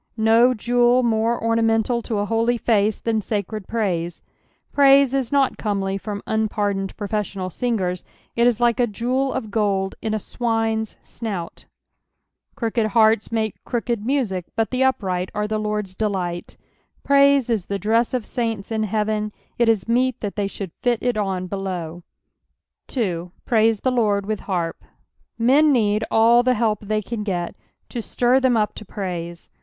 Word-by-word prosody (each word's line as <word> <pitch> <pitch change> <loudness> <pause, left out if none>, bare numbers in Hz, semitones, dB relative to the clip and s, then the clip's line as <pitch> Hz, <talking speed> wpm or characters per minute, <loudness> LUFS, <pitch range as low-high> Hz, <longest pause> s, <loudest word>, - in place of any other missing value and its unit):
No 225 +3 +4
jewel 245 +2 +3
more 230 0 +1
ornamental 230 +1 +1
to 225 -1 -3
a 205 - 0
holy 230 +2 +1
face 215 -2 +2
than 225 -2 0
sacred 210 -1 -4
praise, 175 -7 -2 0.5
praise 275 -1 +5
is 270 -2 -1
not 275 -2 +2
comely 195 -2 -1
from 205 +1 -5
unpardoned 205 -3 -1
profes 210 -1 -3
Monal 185 -1 -4
singers; 185 -6 -1 0.3
it 235 +1 +4
is 240 -2 +2
like 240 0 +2
a 245 - +3
jeweT 250 +5 -1
of 220 -5 -4
gold 200 -3 0
in 220 -1 -1
a - - +1
swiue's 225 0 -2
snout. 195 -8 -6 0.9
Crooked 230 -1 0
hearts 220 0 +3
make 220 -2 -2
crooked 235 -2 -2
music, 225 -9 -1
but 225 0 0
tlie 255 +1 +1
upright 185 -8 0
are 210 0 -1
the 215 0 -1
Lord's 210 -2 -2
delight. 185 -4 -3 0.5
^Praise 280 -2 +5
is 210 -5 -1
the 200 - -2
dress 225 +5 +1
of 240 -4 -2
saints 225 -4 -3
in 220 -1 0
heaven, 215 0 -1 0.3
it 235 -1 +4
is 220 -3 +1
meet 250 +1 +1
that 205 -2 -4
they 205 -1 0
should 195 -2 -6
fit 245 -1 +2
it 245 -1 +1
on 190 -3 -2
belowN 180 -3 -4 0.9
2. 180 -8 -2
'• - - -56
Praise 225 -3 +3
the 255 - +1
Lord 210 -5 +1
with 215 0 -2
harp." 175 -4 -3 0.5
Men 275 +6 +4
need 215 -4 +2
alt 235 +2 +5
the 255 0 +3
help 215 -2 0
the^Tan 215 +1 -3
get 175 -4 -2 0.4
to 240 - -4
Stir 245 +3 +2
tbem 255 -3 +3
up 210 - 0
to - - -9
praise. 175 -4 -6
220 Hz, 165 wpm, -22 LUFS, 200-235 Hz, 0.9 s, praise